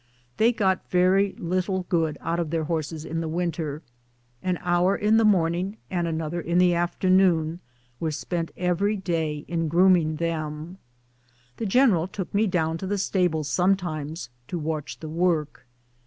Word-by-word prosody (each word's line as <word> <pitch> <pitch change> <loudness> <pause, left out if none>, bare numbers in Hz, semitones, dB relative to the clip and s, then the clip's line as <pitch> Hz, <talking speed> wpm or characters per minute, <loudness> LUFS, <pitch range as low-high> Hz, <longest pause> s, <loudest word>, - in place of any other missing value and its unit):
They 230 +2 +4
got 190 -5 0
very 190 +2 +3
little 185 +2 -1
good 160 -3 0
out 165 +1 -1
of 170 -3 -1
their 165 0 -1
horses 160 -1 -3
in 165 +1 -3
the 165 - -3
win 170 +2 -1
ter. 155 -1 -5 0.6
An 185 -1 -1
hour 180 +2 +2
in 215 +2 +3
the 225 - +4
morning 185 0 +2
and 175 -2 0
another 160 +1 -2
in 170 +2 -1
the 180 -1 +5
after 175 +2 -1
noon 175 -3 +3 0.4
were 165 - -1
spent 165 +2 -3
every 185 +4 +1
day 160 -5 -2
in 165 -1 -1
grooming 170 -1 +4
them. 160 +2 -4 0.8
The 225 - -2
general 195 -7 +4
took 190 -1 -6
me 210 +2 +3
down 165 -3 0
to 190 - -4
the 205 +1 -1
stables 180 -6 0
sometimes 160 -6 -1 0.2
to 175 - -3
watch 155 -2 -4
the 160 - -6
work. 155 -6 -1
170 Hz, 165 wpm, -25 LUFS, 160-185 Hz, 0.8 s, the